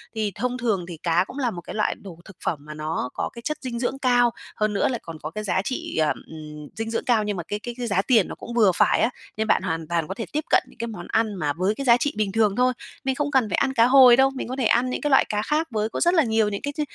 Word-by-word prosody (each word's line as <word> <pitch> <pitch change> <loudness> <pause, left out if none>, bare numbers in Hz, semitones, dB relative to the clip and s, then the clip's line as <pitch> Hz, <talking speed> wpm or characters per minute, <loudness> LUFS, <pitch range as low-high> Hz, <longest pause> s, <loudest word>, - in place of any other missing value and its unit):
Thì 215 -2 -1
thông 250 +3 -2
thường 220 -8 -1
thì 170 - -7
cá 170 +1 +3
cũng 270 - -10
là 250 -4 0
một 175 -3 -7
cái - - -9
loại 215 - 0
đồ 180 -5 -11
thực 190 - -14
phẩm 155 - -1
mà 150 +1 -9
nó 155 -3 -3
có - - -3
cái 235 - -9
chất 305 +5 -3
dinh 240 -3 -4
dưỡng 265 +2 -2
cao, 245 -2 +3 0.2
hơn 215 -1 0
nữa 200 - +2
lại 245 -3 -2
còn 165 -2 -9
có 155 - -5
cái 215 +3 -5
giá 190 -2 0
trị, 255 -5 -4
ờ, 155 -1 +3 0.2
ừm, 150 -2 -9
dinh 225 0 -4
dưỡng 230 - -2
cao, 230 -4 +3
nhưng 205 -2 -2
mà 170 - -4
cái 205 - -3
cái 240 +2 -6
cái 245 -1 -3
giá 195 -2 +2
tiền 220 -3 +3
nó - - -7
cũng 235 - -9
vừa 220 -5 +5
phải - - +3
á. 225 - +3 0.3
Nên 220 - -1
bạn 185 - +3
hoàn 165 -3 -3
toàn 165 -2 -1
có 190 - -4
thể 230 - -5
tiếp 305 +1 -1
cận - - +4
những - - -20
cái 235 - -3
món 190 -6 -8
ăn 220 -1 +1
mà 150 -5 -1
với 185 +6 0
cái 275 - -5
giá 235 -2 +6
trị 290 +3 -1
bình 205 -2 0
thường 210 -2 +2
thôi. 255 0 +3 0.3
Mình 265 -1 0
không 290 +1 -1
cần 255 -6 +2
phải - - 0
ăn 265 - +1
cá 230 -2 +5
hồi 255 -1 +8
đâu, 265 +2 +4
mình - - -4
có 255 - -4
thể 260 - -1
ăn 240 +3 +3
những 255 - -3
cái 295 - 0
loại 270 - +5
cá 210 0 0
khác 305 +7 0
với 215 -1 -1
có - - -4
rất 345 +1 +4
là 320 -4 +5
nhiều 220 -2 +2
những 200 - -4
cái 285 0 -4
ch 305 - 0
220 Hz, 320 wpm, -24 LUFS, 190-250 Hz, 0.3 s, hồi